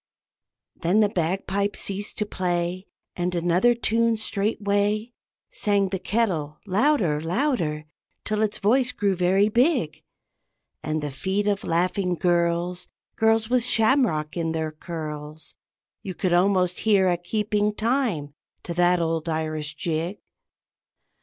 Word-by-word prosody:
Then 185 +6 +2
the 210 - +3
bagpipe 195 +3 -1
ceased 200 +1 -3
to 210 - -1
play, 180 -1 -2 0.3
And 180 0 -2
another 175 +8 +3
tune 230 0 +1
straightway 210 +1 -1 0.4
Sang 205 - +1
the 190 0 -3
kettle, 175 -10 -1
louder, 195 - +2
louder, 165 - -1 0.4
till 215 0 -1
its 215 -1 0
voice 250 +5 +2
grew 200 -5 0
very 185 +3 +3
big; 240 - +1 0.8
And 155 0 -2
the 145 - -3
feet 190 +9 -2
of 205 -1 0
laughing 180 +2 0
girls 175 +1 0 0.3
(Girls 225 0 +2
with 245 0 +2
shamrock 220 - +2
in 165 -2 -1
their 160 -1 -2
curls) 155 -2 -7 0.5
You 185 -2 -6
could 185 -3 0
almost 180 0 +2
hear 200 -4 +3
a 180 - +3
keeping 210 +3 -1
time 215 - -1 0.3
to 170 - -5
that 175 +1 +3
old 165 0 -1
Irish 155 -1 -2
jig. 170 +4 -2
185 Hz, 125 wpm, -24 LUFS, 170-215 Hz, 0.8 s, the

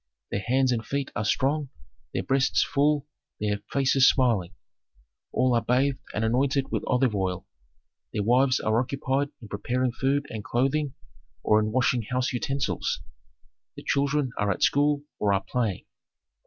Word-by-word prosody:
Their - - 0
hands 130 +4 +2
and 115 -2 -1
feet 140 +4 -3
are 110 - -1
strong, 140 +6 0 0.4
their - - -2
breasts 135 0 +2
full, 145 0 +1 0.3
their 105 -1 -1
faces 135 -1 +4
smiling. 105 -8 +1 0.8
All 130 -1 +2
are 115 - +3
bathed 130 +4 +1 0.2
and 110 - 0
anointed 135 +4 +1
with - - -1
olive 125 -2 +2
oil. 95 -3 -2 0.7
Their 105 - -1
wives 125 +4 +3
are 110 +1 +1
occupied 140 +2 -1
in - - -8
preparing 120 +5 -1
food 135 +3 0
and 110 -2 -5
clothing 135 +4 0 0.5
or 105 - +4
in 110 0 -1
washing 125 0 +2
house 125 +1 0
utensils; 135 +2 -2 0.7
the - - -10
children 140 -1 +1
are 105 -1 +1
at 95 - -1
school 145 0 +3 0.2
or 100 -1 +2
are 95 - -1
playing. 115 -7 -1
130 Hz, 155 wpm, -26 LUFS, 110-140 Hz, 0.8 s, faces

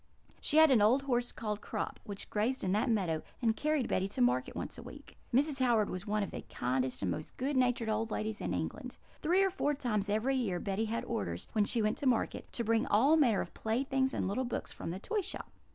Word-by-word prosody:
She 300 - +2
had 315 -2 +8
an 240 -5 +5
old 245 +7 +4
horse 245 -3 0
called 210 -2 -4
Crop, - - -4
which 200 -3 -6
grazed 230 +5 0
in 185 - 0
that 215 +6 +1
meadow, 180 -8 +1 0.2
and 225 -3 +2
carried 300 -2 0
Betty 190 - 0
to - - -7
market 125 +1 +2
once - - -4
a - - -8
week. - - -12 0.2
Mrs. 275 +2 +2
Howard 230 -4 +3
was 185 +3 -5
one 210 0 +1
of 200 - -5
the - - -5
kindest 130 -1 -1
and 90 - +1
most 85 - -6
good 275 +3 -1
natured 245 -3 +2
old 220 +1 0
ladies 215 0 -3
in - - -2
England. - - -4 0.2
Three 365 +5 +3
or 385 - +2
four 295 -6 0
times 215 -7 -1
every 225 +6 +1
year 195 -8 -1
Betty 200 +4 -1
had 230 +1 -2
orders, 85 - -3
when 210 -2 +2
she 230 +1 0
went 215 0 0
to 280 - 0
market, 245 -3 0
to 235 - -2
bring 230 +3 +2
all 270 +7 +5
manner 245 -10 +4
of - - -7
playthings 265 +4 0
and - - -1
little 205 +7 0
books 240 - -4
from - - -6
the 175 - -3
toy 415 - -1
shop. - - -6
225 Hz, 235 wpm, -32 LUFS, 205-265 Hz, 0.2 s, had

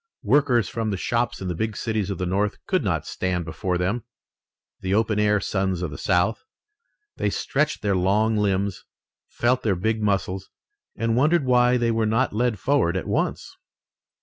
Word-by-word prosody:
Workers 135 -6 +3
from 115 -1 -3
the 100 - -2
shops 120 +4 -1
in 95 - -4
the 90 - -1
big 110 +4 -3
cities 110 -4 -1
of 100 - -3
the 90 - -2
North 100 +3 0
could - - +1
not - - -1
stand 90 -2 -2
before 90 +1 -2
them, 95 +7 -1 0.8
the 95 +1 -1
open 110 -1 +1
air 105 0 +3
sons 95 -3 -1
of 85 - -3
the 70 - -7
South. 95 +3 +1 0.7
They - - 0
stretched 150 -1 -1
their 100 -2 +2
long 105 +5 +2
limbs, 100 -2 0 0.4
felt 120 +2 +1
their 105 -4 +1
big 110 +4 -1
muscles, 95 -2 -1 0.5
and 115 0 0
wondered 150 +4 +3
why 125 0 +4
they 120 -1 +1
were 110 -1 +1
not 115 +3 +1
led 120 0 +1
forward 95 -6 +1
at 90 - -3
once. - - -2
105 Hz, 175 wpm, -24 LUFS, 95-115 Hz, 0.8 s, why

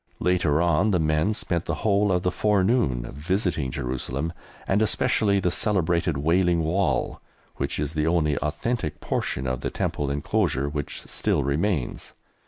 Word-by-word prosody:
Later 85 -3 +2
on 85 +5 +3
the 95 - +3
men 80 +6 +1
spent 85 -5 -2
the 85 - -1
whole 100 -1 +3
of 90 -1 +1
the 90 - +1
forenoon 100 - +2
visiting 80 -1 -1
Jerusalem, 65 +5 -3 0.3
and 100 +2 +2
especially 105 -1 +2
the 90 -2 0
celebrated 85 -7 +1
Wailing 85 +3 +2
Wall, 90 +5 0 0.4
which 70 +1 -2
is 75 +1 -2
the 75 0 0
only 80 -3 +2
authentic 75 +4 -2
portion 65 - -2
of 65 -1 -2
the - - -2
Temple 70 -1 -2
enclosure 70 -1 0
which 70 -1 -4
still - - 0
remains. 75 +1 -1
85 Hz, 150 wpm, -25 LUFS, 70-95 Hz, 0.4 s, on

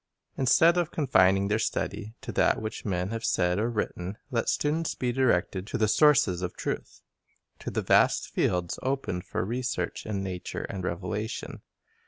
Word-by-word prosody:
Instead 165 +6 +4
of 175 - 0
confining 95 - +3
their 105 +2 +1
study 110 0 -3
to 135 -3 -6
that - - +2
which 110 0 -6
men 95 -1 -1
have 115 0 -4
said 90 -3 +1
or 115 +3 +1
written, 100 -4 -3
let 115 -2 0
students 155 +2 0
be 125 -1 -1
directed 100 -6 +1
to 120 - -2
the 110 -1 +2
sources 110 - +4
of 90 - -4
truth, - - -5 0.6
to - - -5
the - - -2
vast - - +3
fields 90 -1 -1
opened 130 -9 -2
for - - -3
research 125 +3 -3
in 100 -2 -2
nature 90 -2 -5
and 95 -2 -5
revelation. 105 +5 -4
110 Hz, 165 wpm, -28 LUFS, 95-125 Hz, 0.6 s, Instead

